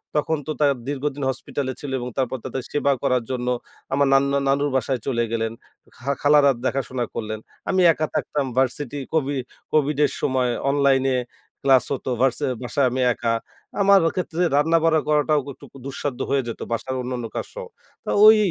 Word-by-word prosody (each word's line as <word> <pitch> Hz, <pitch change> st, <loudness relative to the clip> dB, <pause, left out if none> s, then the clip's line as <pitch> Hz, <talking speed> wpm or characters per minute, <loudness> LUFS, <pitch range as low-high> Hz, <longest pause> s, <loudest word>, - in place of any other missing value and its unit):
তখন 160 Hz, +2 st, +1 dB
তো -, -, -1 dB
তা 150 Hz, -, +4 dB, 0.2 s
দীর্ঘদিন 145 Hz, 0 st, -3 dB
হসপিটালে 130 Hz, +1 st, -3 dB
ছিলো 140 Hz, -2 st, -5 dB
এবং 125 Hz, -, -4 dB
তারপর 130 Hz, 0 st, 0 dB
তাদের 135 Hz, -, -3 dB
সেবা 145 Hz, -1 st, +2 dB
করার 125 Hz, -2 st, +2 dB
জন্য 125 Hz, -1 st, -3 dB, 0.5 s
আমার 140 Hz, +1 st, +3 dB
নান্না 140 Hz, +1 st, +3 dB
নানুর 140 Hz, +1 st, +2 dB
বাসায় 130 Hz, 0 st, 0 dB
চলে 120 Hz, -3 st, +1 dB
গেলেন, 115 Hz, -1 st, -1 dB, 0.5 s
খা 135 Hz, +3 st, -2 dB
খালারা 145 Hz, -1 st, +6 dB
দেখাশোনা 130 Hz, -2 st, -1 dB
করলেন। 110 Hz, -1 st, -4 dB, 0.3 s
আমি 185 Hz, -1 st, +3 dB
একা 155 Hz, -, -1 dB
থাকতাম 145 Hz, -2 st, -1 dB
ভার্সিটি, 135 Hz, +2 st, 0 dB
কোভি 145 Hz, -3 st, +1 dB, 0.4 s
কোভিডের 150 Hz, -1 st, +2 dB
সময় 130 Hz, -2 st, +1 dB, 0.2 s
অনলাইনে 135 Hz, -2 st, +3 dB, 0.5 s
ক্লাস 130 Hz, -3 st, +5 dB
হতো, 135 Hz, -, -4 dB
ভার্সে 130 Hz, -2 st, +2 dB, 0.2 s
বাসায় 135 Hz, +2 st, +1 dB
আমি 130 Hz, +1 st, -1 dB
একা। 115 Hz, -1 st, -1 dB, 0.5 s
আমার 200 Hz, 0 st, +6 dB, 0.2 s
ক্ষেত্রে 180 Hz, -1 st, -2 dB
রান্না-বাড়া 160 Hz, +1 st, +3 dB
করাটাও 150 Hz, 0 st, +3 dB
ক -, -, -14 dB
একটু -, -, -15 dB, 0.2 s
দুঃসাধ্য 140 Hz, -1 st, -4 dB
হয়ে 135 Hz, -2 st, +1 dB
যেত 115 Hz, -, -5 dB
বাসার 130 Hz, +3 st, -2 dB
অন্যান্য 125 Hz, -1 st, -4 dB
কাজ -, -, -2 dB
সহ। -, -, -6 dB, 0.4 s
তা -, -, -2 dB
ওই 220 Hz, 0 st, +9 dB
140 Hz, 165 wpm, -23 LUFS, 130-150 Hz, 0.5 s, ওই